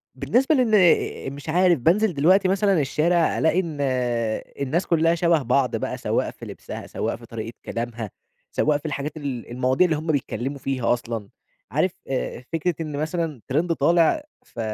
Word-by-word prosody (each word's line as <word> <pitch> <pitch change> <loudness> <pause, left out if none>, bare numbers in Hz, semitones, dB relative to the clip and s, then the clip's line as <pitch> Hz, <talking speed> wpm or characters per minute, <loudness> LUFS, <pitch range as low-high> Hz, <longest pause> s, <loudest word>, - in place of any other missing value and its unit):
بالنسبة 270 +5 +2
لأن 210 - +3
مش 145 +2 -9
عارف 175 -1 +4
بانزل 185 - +3
دلوقتي 185 +7 +4
مثلًا 195 -1 +2
الشارع 165 +5 +2
ألاقي 160 +3 +3
إن 165 -5 -3 0.8
الناس 150 +7 0
كلّها 165 0 +3
شبه 170 -2 +3
بعض 130 +1 +1
بقى، - - -3
سواء - - -1
في - - -11
لبسها، - - -8
سواء - - -2
في - - -13
طريقة 115 0 -6
كلامها، 115 -2 -4 0.4
سواء 150 -1 +2
في 145 - -15
الحاجات 150 0 -3
ال 135 -6 -5
المواضيع 130 +6 +2
اللي 165 -3 +1
هُم 155 +2 -6
بيتكلّموا 135 -1 -2
فيها 130 -3 0
أصلًا، 115 -4 -4 0.4
عارف 155 +6 +1 0.2
آآ 130 -2 -3
فكرة 165 +1 0
إن 150 -3 -4
مثلًا 155 -3 -2
ترند 165 +6 +1
طالع 170 - +3 0.2
ف - - -12
155 Hz, 165 wpm, -23 LUFS, 130-175 Hz, 0.8 s, عارف